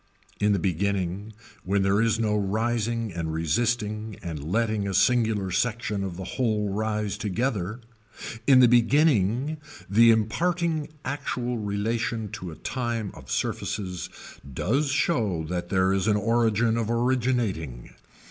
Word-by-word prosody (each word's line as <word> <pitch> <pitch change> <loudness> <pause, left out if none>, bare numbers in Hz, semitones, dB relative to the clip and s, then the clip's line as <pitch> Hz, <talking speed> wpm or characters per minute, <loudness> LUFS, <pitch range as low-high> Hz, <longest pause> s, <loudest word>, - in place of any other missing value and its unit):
In 105 0 +3
the 100 - +3
beginning 95 +2 -1 0.3
when 100 +1 +1
there 100 +2 +3
is 115 -1 +2
no 105 -2 +1
rising 115 +1 -1
and 80 -2 -3
resisting 105 +6 -1
and 80 -5 -5
letting 105 +4 0
a 95 - -2
singular 110 -6 +2
section 105 -1 -1
of 90 -3 -5
the 95 - -5
whole 110 -2 -1
rise 105 -1 -2
together, 110 0 -2 0.7
in 130 -2 +7
the 125 - +8
beginning 125 - +3 0.3
the 115 +4 +6
imparting 160 +8 +1 0.2
actual 125 -4 -2
relation 110 +2 -2
to 100 -5 -6
a 80 - -8
time 120 -3 -3
of - - -13
surfaces 90 -4 -3 0.4
does 135 - 0
show 115 - +1
that 85 +2 -4
there 95 0 +2
is 95 0 0
an 105 -1 +3
origin 115 +1 +2
of 115 -1 -1
originating. 115 - -1
110 Hz, 135 wpm, -26 LUFS, 95-120 Hz, 0.7 s, the